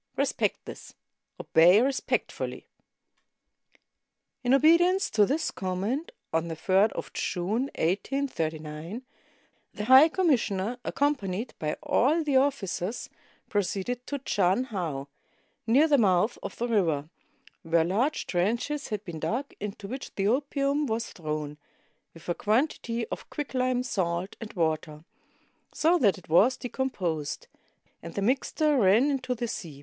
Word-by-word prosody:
Respect - - 0
this. - - -10 0.4
Obey 175 +5 +5
respectfully." 265 +3 -1 1.8
In 245 - +1
obedience 340 +7 +4
to 210 -2 +4
this 310 +4 0
command, 200 - -3 0.2
on 165 +1 +1
the 165 - -4
3d 190 +6 +3
of - - -6
June, 215 +9 -1
1839, 165 - -2 0.7
the 210 - -4
high 260 +6 +8
commissioner, 245 - 0
accompanied 235 -7 -1
by 155 -1 -1
all 310 +6 +2
the 290 -3 0
officers, 235 -6 0 0.4
proceeded 205 +5 -2
to 285 - -2
Chan 200 -4 +1
hau, 155 -8 -3 0.6
near 270 +8 +5
the 290 -3 +4
mouth 195 +1 +3
of - - -6
the 240 - -2
river, 165 -10 +1 0.5
where 165 0 +2
large 235 - 0
trenches 235 +11 -1
had 210 -2 -4
been 170 -4 -6
dug, 260 - -3
into 205 0 -6
which 260 +5 -7
the 195 0 0
opium 280 +3 +1
was 230 0 -3
thrown, 150 -2 -5 0.6
with 165 - -14
a 175 - +1
quantity 230 - 0
of - - -7
quicklime, 255 -4 -1
salt, 185 -5 -2
and 225 - -7
water, 155 -2 -2 0.7
so 340 +3 +2
that 205 -7 +3
it 185 - -15
was 205 +11 +4
decomposed, 185 - -3 0.6
and 170 - -9
the 200 - -1
mixture 280 +4 +1
ran 220 +8 +4
into 255 -2 -2
the 240 0 -3
sea. 160 -10 -6
215 Hz, 130 wpm, -27 LUFS, 175-270 Hz, 1.8 s, high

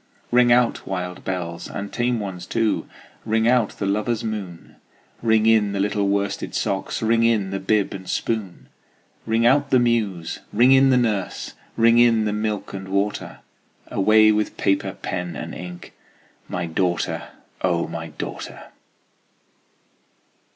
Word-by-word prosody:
Ring 120 0 +5
out, 120 0 +2
wild 90 -1 -4
bells, 85 -3 -4
and 100 0 -6
tame 120 -1 0
ones 95 -4 -6
too! 115 -2 0 0.4
Ring 110 0 +1
out 120 -3 +2
the 100 - -2
lover's 105 +3 0
moon! 100 -6 -6 0.4
Ring 110 -1 +3
in 110 -3 +4
the 100 - -2
little 100 0 0
worsted 100 0 -1
socks! 95 +3 -2
Ring 115 +1 +3
in 110 -4 +2
the 95 - -2
bib 100 +1 +1
and 95 -1 -8
spoon! 105 -6 -3 0.6
Ring 115 +1 +2
out 140 +3 +4
the 130 - +5
muse! 110 -9 0
ring 120 +5 +5
in 135 0 +6
the 130 - +4
nurse! 110 -6 -1 0.2
Ring 115 +1 +5
in 115 -2 +4
the 105 - 0
milk 105 -1 -3
and 95 -1 -6
water! 100 +2 -2 0.5
Away 110 +2 +5
with 105 0 -1
paper, 95 0 0
pen, 90 -1 -4
and - - -6
ink 90 0 -9 0.5
My 90 -1 -3
daughter, 85 +1 -1 0.3
O 85 -2 +1
my 80 -1 -6
daughter! 75 - -8
105 Hz, 145 wpm, -22 LUFS, 95-115 Hz, 0.6 s, in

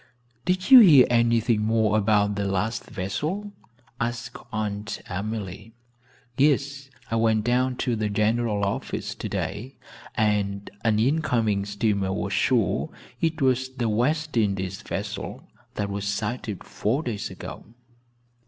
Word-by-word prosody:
"Did 185 +3 0
you 260 - +13
hear 155 - +8
anything 115 -1 +3
more 110 -1 +2
about 105 -1 +3
the 100 0 -2
last 100 +3 -1
vessel?" 155 - -3 0.5
asked 120 +1 -3 0.2
Aunt 105 -1 -3
Emily. 105 +2 -5 0.6
"Yes, 140 -1 +1 0.2
I 115 - +1
went 110 -1 +2
down 125 +2 +1
to 125 -3 +1
the 110 -1 -1
general 105 0 +1
office 100 - -3
today, 105 +8 -4 0.4
and 100 -3 0
an 110 -2 +2
incoming 115 -6 +1
steamer 100 -2 0
was 100 0 -2
sure 120 -6 +1 0.3
it 160 -2 0
was 130 0 +2
the 120 -3 -1
West 150 +8 0
Indies 95 -3 0
vessel - - -5 0.3
that 105 - -1
was 100 0 -3
sighted 105 0 -3
four 130 +9 -1
days 110 -5 -3
ago." - - -8
110 Hz, 125 wpm, -25 LUFS, 100-125 Hz, 0.6 s, you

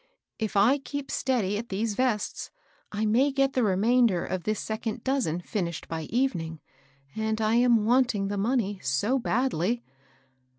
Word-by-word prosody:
" - - -60
If - - -3
I 245 +8 +5
keep 285 0 -6
steady 210 -6 0
at 230 - -7
these 210 +3 -1
vests, 235 -2 -1 0.4
I 215 +1 -1
may 250 +7 +3
get 275 0 +1
the 255 - +1
remainder 215 -1 +3
of 185 -2 -4
this 215 0 0
second 220 +1 -4
doas 265 -4 +1
en 165 +3 -2
finished 175 -4 -4
by 160 -1 -4
evening; 175 - -1 0.6
and 220 0 -1
I 215 0 +1
am 240 -3 +4
wanting 235 -4 +2
the 205 0 -3
money 205 -3 0
so 170 - +1
badly." 240 -2 0
220 Hz, 165 wpm, -27 LUFS, 195-250 Hz, 0.6 s, I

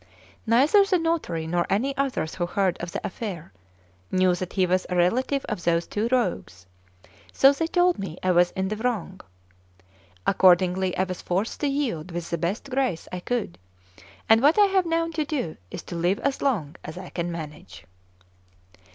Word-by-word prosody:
Neither 275 - +5
the 395 -2 +2
notary 325 - -1
nor 175 +1 0
any 265 +8 0
others 270 - -1
who 175 -1 -2
heard 185 -1 +1
of 170 0 -5
the - - -5
affair, 185 - -6 0.6
knew 185 -1 +3
that 180 0 -5
he 190 -2 +2
was 185 +1 0
a 180 - -1
relative 255 +10 +1
of 195 -5 -4
those 170 0 +1
two 215 +3 -2
rogues; 95 - -1 0.7
so 270 - +6
they 325 +3 -1
told 355 - +2
me 185 -4 -5
I 185 - +3
was 175 0 +4
in 190 0 -2
the 215 - -3
wrong. 210 -6 -3 1.0
Accordingly, 185 0 +3
I 185 - +2
was 185 -1 -5
forced 190 +5 -2
to 295 - 0
yield 255 - -2
with 170 -1 -5
the 170 - -1
best 195 - -3
grace 255 -11 -1
I 180 - -4
could; 195 - -3 0.7
and 225 +1 +6
what 295 +7 +4
I 415 - +7
have 380 -3 +1
now 330 0 +1
to 310 -1 -1
do 275 - -3
is - - -7
to 175 - -8
live 175 +4 +1
as 275 -1 -1
long 185 - -1
as 155 +3 -8
I 185 -1 -8
can 175 0 -3
manage. 150 - -9
190 Hz, 185 wpm, -25 LUFS, 175-270 Hz, 1.0 s, I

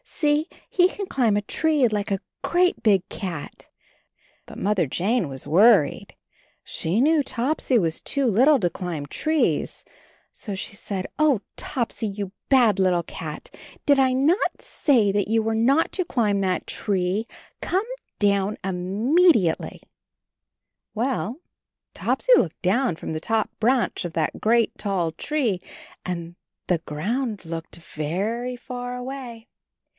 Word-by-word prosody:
See, 300 0 0 0.2
he 360 0 +3
can 400 +1 -5
climb 235 - +1
a 205 - -1
tree 300 +3 +2
like 210 -1 -2
a 195 -1 0 0.2
great 360 +1 +2
big 195 -4 +3
cat." 175 -7 -6 0.8
But - - -10
Mother 195 -5 +1
Jane 190 - 0
was 135 -1 -4
worried. 195 -2 +4 0.5
She 175 +7 0
knew 305 +4 +4
Topsy 260 0 0
was 165 -6 0
too 280 -1 0
little 260 +6 +5
to 175 -5 +1
climb 170 -5 -5
trees, 310 - 0 0.5
so 205 - -6
she 190 - -4
said, 195 -2 -4
"Oh, 290 -8 +3
Topsy, 235 -4 -2
you 200 -1 -5 0.2
bad 240 -7 +4
little 180 -2 +2
cat! 155 -2 -8 0.3
Did 285 -1 +4
I 260 -1 +4
not 300 - +1
say 235 -9 +2
that 205 0 0
you 225 +1 +2
were 225 0 0
not 270 +8 +3
to 370 - 0
climb 210 - +1
that 185 -1 -1
tree? 195 +2 -1 0.3
Come 385 +4 0 0.3
down 200 0 +1
immediately 195 - +2 1.1
Well 250 +3 -2 0.3
— - - -64
Topsy - - +1
looked 165 - -1
down 220 +2 +2
from 160 - -6
the 155 - -2
top 220 +2 0
branch 245 +2 +1
of 175 -2 -5
that 160 -2 -2
great 230 +1 +2
tall 185 -5 -1
tree 230 - -1 0.4
and 170 -1 -5 0.3
the 175 -2 +1
ground 205 - -3
looked 165 0 -6
very 195 +11 -3
far 245 0 -6
away. 250 -2 -7
215 Hz, 140 wpm, -24 LUFS, 185-260 Hz, 1.1 s, little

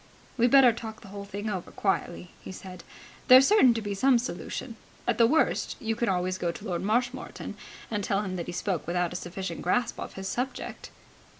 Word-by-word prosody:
"We'd 240 0 +3
better 260 -2 +7
talk 225 0 -8
the 200 - -12
whole 200 0 -7
thing 205 +2 -5
over 185 -4 -3
quietly," 180 -3 -2
he - - -8
said. 185 -1 -10 0.4
"There's 260 +1 +9
certain 265 - +6
to 225 - -3
be 205 -1 -3
some 255 +6 +4
solution. 240 +2 -5 0.3
At - - +1
the 230 - +7
worst 315 +6 +1
you 225 -1 -2
can 235 0 0
always 185 0 0
go 170 -1 0
to - - -10
Lord 175 -2 -2
Marshmoreton 245 +5 -2 0.4
and 210 -2 -1
tell 200 +1 0
him 185 -2 -4
that 170 - -4
he - - -3
spoke 180 -2 -2
without 175 0 0
a - - -7
sufficient 180 -1 -5
grasp 235 +6 0
of - - -6
his 190 0 -6
subject." 250 +6 -4
205 Hz, 205 wpm, -28 LUFS, 185-240 Hz, 0.4 s, There's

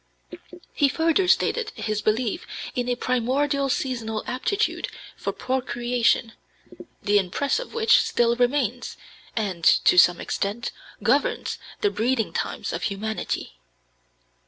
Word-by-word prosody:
He 285 -2 +3
further 330 +5 +2
stated 460 +4 +2
his 215 -1 -2
belief 220 +1 -1 0.3
in 245 0 -2
a 245 - +1
"primordial 270 +4 0
seasonal 230 -5 -2
aptitude 405 - -1 0.3
for - - -3
procreation, 240 -2 0 0.7
the 205 -1 +4
impress 205 - 0
of - - -8
which 450 -1 +5
still 235 0 +2
remains, 245 -1 0 0.4
and, 195 -6 -2
to 180 - +6
some 175 0 +5
extent, 210 +4 -3 0.3
governs 255 +7 +1 0.2
the 415 - +2
breeding 235 - 0
times - - -3
of - - -3
humanity." 210 - -4
245 Hz, 115 wpm, -24 LUFS, 220-280 Hz, 0.7 s, to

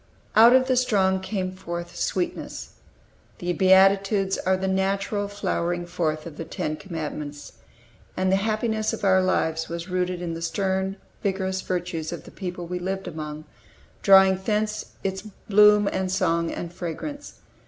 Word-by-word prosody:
"Out 230 +3 +8
of 260 0 +4
the 260 0 +2
strong 195 -6 +2
came 190 -1 -3
forth 175 -2 -6
sweetness." 180 -2 -3 0.7
The 175 0 -2
Beatitudes 195 +2 +4
are 185 0 +1
the 190 +1 -2
natural 195 +2 0
flowering 175 -3 -2
forth 160 -3 -2
of 165 -3 -9
the - - -4
Ten 155 -1 -3
Commandments. 150 -4 -6 0.6
And 185 0 +1
the 190 - +4
happiness 215 +1 0
of - - -6
our 190 -1 +5
lives 160 -3 0
was 170 +2 -5
rooted 180 0 -1
in 175 -1 -4
the 165 - -6
stern, 190 +2 -1 0.3
vigorous 190 -1 -1
virtues 175 -3 -3
of 170 - -6
the - - -13
people 180 -2 -6
we 180 +1 -4
lived 190 +1 -3
among, 155 -2 -6 0.6
drawing 190 -1 +6
thence 215 0 -1 0.2
its 190 0 -2
bloom 210 0 +4
and 190 -1 -1
song, 170 -3 +1
and 170 0 -6
fragrance. 235 - -6
190 Hz, 155 wpm, -25 LUFS, 175-195 Hz, 0.7 s, Out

